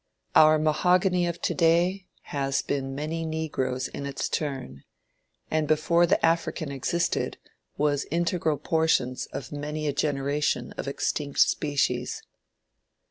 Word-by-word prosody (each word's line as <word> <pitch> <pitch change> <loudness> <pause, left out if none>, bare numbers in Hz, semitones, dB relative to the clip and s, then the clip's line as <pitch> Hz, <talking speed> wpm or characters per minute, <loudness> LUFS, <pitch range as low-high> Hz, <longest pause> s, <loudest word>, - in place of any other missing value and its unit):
Our 155 0 +7
mahogany 180 +4 +2
of 170 0 -5
to - - +1
day 175 +3 +2 0.3
has 135 -1 0
been 135 -1 -2
many 155 +3 -3
negroes 145 -5 -2
in 140 - -6
its 140 - -3
turn, 130 - -4 0.7
and 155 -1 +1
before 170 +3 +3
the - - +3
African 165 -2 0
existed, 155 +6 -1 0.4
was 145 -1 +1
integral 165 -2 0
portions 150 -7 +1
of - - -7
many 150 +1 -4
a 145 - 0
generation 145 0 0
of - - -6
extinct 140 +1 -1
species." 145 -2 +1
150 Hz, 125 wpm, -26 LUFS, 140-165 Hz, 0.7 s, Our